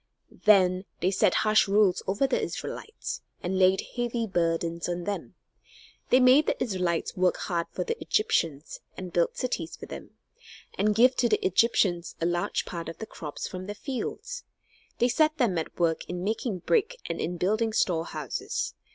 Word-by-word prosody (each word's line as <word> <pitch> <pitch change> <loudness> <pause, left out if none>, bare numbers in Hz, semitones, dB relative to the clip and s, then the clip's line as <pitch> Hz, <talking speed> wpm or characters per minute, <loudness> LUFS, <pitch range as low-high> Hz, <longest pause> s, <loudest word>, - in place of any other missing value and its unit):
Then 185 -3 +5
they 185 - +1
set 185 - +3
harsh 215 0 +4
rules 200 -2 +3
over 200 +8 +2
the 265 - +1
Israelites, 455 +3 -5 0.2
and 185 +2 -1
laid 185 +1 +4
heavy 240 -1 -1
burdens 170 -3 -1
on 175 0 -2
them. 205 +2 -4 0.7
They 255 - +6
made 260 +4 +6
the - - +1
Israelites 180 -7 -1
work 180 0 +2
hard 170 -2 -2
for - - -3
the 465 +1 -4
Egyptians, 160 - 0 0.2
and 185 -2 -7
build 170 -1 +1
cities 175 -10 -3
for - - -8
them, - - -10 0.6
and 210 +2 +2
give 250 +4 +5
to 240 - +3
the 210 - +1
Egyptians 185 -3 +2
a 165 - 0
large 175 0 0
part 170 -2 -5
of 165 - -8
the 220 - -6
crops 150 -8 -6
from 185 0 -7
their 205 - -5
fields. 295 - -5 0.5
They 240 - +3
set 310 +5 +2
them 235 - +2
at 160 - -6
work 165 -2 +1
in 180 0 -4
making 210 -2 -2
brick 485 +2 +2
and - - -3
in 175 +2 -2
building 215 +6 +1
storehouses. 170 -6 -1
190 Hz, 170 wpm, -27 LUFS, 175-240 Hz, 0.7 s, They